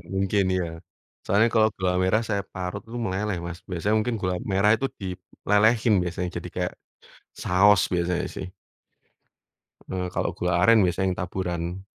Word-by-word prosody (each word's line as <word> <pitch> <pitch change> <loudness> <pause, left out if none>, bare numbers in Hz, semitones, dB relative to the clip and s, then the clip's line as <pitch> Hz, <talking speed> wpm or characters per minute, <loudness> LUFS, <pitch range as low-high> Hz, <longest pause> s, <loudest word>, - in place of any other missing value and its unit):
mungkin 100 +1 +2
ya. 90 - -1 0.6
Soalnya 105 +3 +4
kalau 110 -1 +5
gula 95 -1 +1
merah 100 +5 +2
saya 100 -1 0
parut 95 +2 -4
itu 120 - -6
meleleh, 95 0 -1
Mas, 85 +1 -6
biasanya 95 +4 0
mungkin 115 +1 -1
gula 90 -1 0 0.2
merah 100 +2 +4
itu 135 +5 -2
dilelehin 105 +4 +1
biasanya, 90 0 -3
jadi - - -6
kayak - - -2 0.7
saos 95 +1 +5
biasanya 90 0 0
sih. - - -5 1.4
Eee, 90 -1 -2
kalau - - 0
gula 90 -1 0
aren 115 +4 +6
biasanya 95 +2 0
yang - - -25
taburan. 90 0 -3
95 Hz, 150 wpm, -25 LUFS, 90-105 Hz, 1.4 s, aren